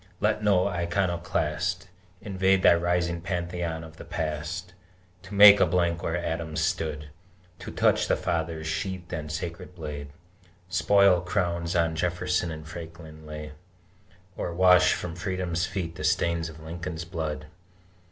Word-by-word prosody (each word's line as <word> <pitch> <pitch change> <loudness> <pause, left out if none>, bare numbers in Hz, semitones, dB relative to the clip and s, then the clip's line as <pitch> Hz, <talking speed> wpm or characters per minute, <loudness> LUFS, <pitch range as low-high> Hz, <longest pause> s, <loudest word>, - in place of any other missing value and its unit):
Let 105 0 +1
no 100 -3 +4
iconoclast 85 -1 -1 0.3
Invade 95 -1 +2
thy - - +8
rising 85 0 0
Pantheon 85 -2 -3
of 80 0 -12
the - - -9
Past, 80 +4 -4 0.5
To 100 +2 -9
make 100 0 +10
a - - +6
blank 85 0 +1
where 85 - -1
Adams 80 -2 -3
stood, 75 -2 -2 0.5
To - - -7
touch - - +2
the - - +3
Father's 80 -2 -2
sheathed 90 +2 -4
and 75 -1 -4
sacred 85 +2 -6
blade, 75 -4 -6 0.6
Spoil 90 +1 +4
crowns 85 -2 -1
on 80 -1 +2
Jefferson 90 +1 0
and 80 -1 -7
Franklin 80 -1 -10
laid, 75 0 -7 0.8
Or 85 - -4
wash 90 0 +6
from 85 -2 -5
Freedom's 90 -2 -2
feet 85 -4 -4
the 80 - -8
stain 85 +2 +2
of 80 -1 -6
Lincoln's 80 +1 -6
blood! 80 -3 -4
85 Hz, 140 wpm, -27 LUFS, 80-90 Hz, 0.8 s, make